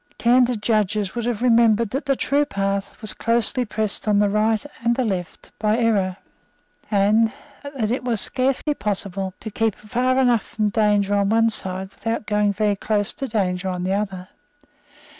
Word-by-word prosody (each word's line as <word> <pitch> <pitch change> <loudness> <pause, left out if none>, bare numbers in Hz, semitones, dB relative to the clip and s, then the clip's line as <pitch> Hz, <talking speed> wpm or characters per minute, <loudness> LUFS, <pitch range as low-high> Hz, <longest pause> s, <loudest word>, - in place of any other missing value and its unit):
Candid 240 -2 +3
judges 210 -2 0
would 235 -1 -3
have 240 -1 -2
remembered 230 -2 +4
that 275 +3 -3
the 275 - +2
true 285 +3 +1
path 195 -5 -3
was 215 - -2
closely 235 +2 +1
pressed 215 -1 -2
on 210 -1 +3
the 205 0 +3
right 215 +2 +1 0.2
and 235 - -4
on 255 -3 +1
the 195 - +1
left 180 -2 -9
by 215 +1 +1
error, 200 -6 +1 0.7
and 215 +2 +3 0.3
that 270 -7 -3
it 250 +1 -2
was 240 -4 0
scarcely 265 +6 0
possible 195 -4 -2
to 220 - -7
keep 220 0 0
far 250 +4 -1
enough 245 -4 +3
from 215 -2 -2
danger 205 -2 +2
on 200 -1 +2
one 225 +1 +3
side 190 -2 -3
without 225 -1 -3
going 210 -1 +1
very 205 +1 0
close 205 0 0
to 275 -3 -5
danger 190 -4 -1
on 180 -1 -3
the 185 +1 0
other. 195 -3 -3
215 Hz, 180 wpm, -22 LUFS, 200-235 Hz, 0.7 s, remembered